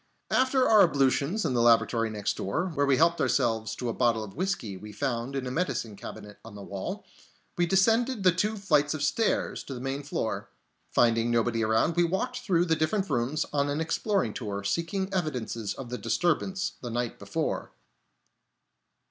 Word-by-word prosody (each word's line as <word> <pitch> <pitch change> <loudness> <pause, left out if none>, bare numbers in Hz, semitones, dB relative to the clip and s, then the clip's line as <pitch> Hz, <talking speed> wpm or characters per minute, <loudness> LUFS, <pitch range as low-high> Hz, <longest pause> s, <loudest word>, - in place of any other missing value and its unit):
After 260 0 +3
our 215 -2 +7
ablutions 145 +4 +2
in 140 - 0
the 120 - +2
lavatory 115 -1 +3
next 105 -2 -2
door, 165 - -2
where 145 -1 +1
we 135 -2 +4
helped 170 +2 +3
ourselves 110 -1 +1
to 125 - -4
a 115 - -1
bottle 115 -3 +1
of 100 -2 -9
whiskey 185 - -2
we 105 +3 -9
found 120 +2 -2
in 135 -1 -2
a 125 - -3
medicine 130 - -2
cabinet 105 +1 -10
on 115 -2 -11
the 100 - -8
wall, 100 -1 -5 0.5
we 175 0 +1
descended 225 +5 +2
the 185 - +6
two 210 +5 -1
flights 150 -6 +2
of 150 - -3
stairs 220 +9 0
to 135 - -6
the - - -6
main 135 +2 -3
floor. 110 -8 -3 0.4
Finding 115 0 +3
nobody 115 -1 +1
around, 110 +9 +2
we 175 - +4
walked 220 +9 -1
through 180 -8 +1
the 160 -2 +2
different 195 +5 0
rooms 130 +6 0
on 140 0 +1
an 145 +2 -1
exploring 160 - 0
tour, 100 -3 -4
seeking 170 - -2
evidences 125 - -2
of 125 -3 -8
the 125 - -3
disturbance 185 +3 0
the 120 - -5
night 120 0 -3
before. - - -3
140 Hz, 180 wpm, -28 LUFS, 115-180 Hz, 0.5 s, our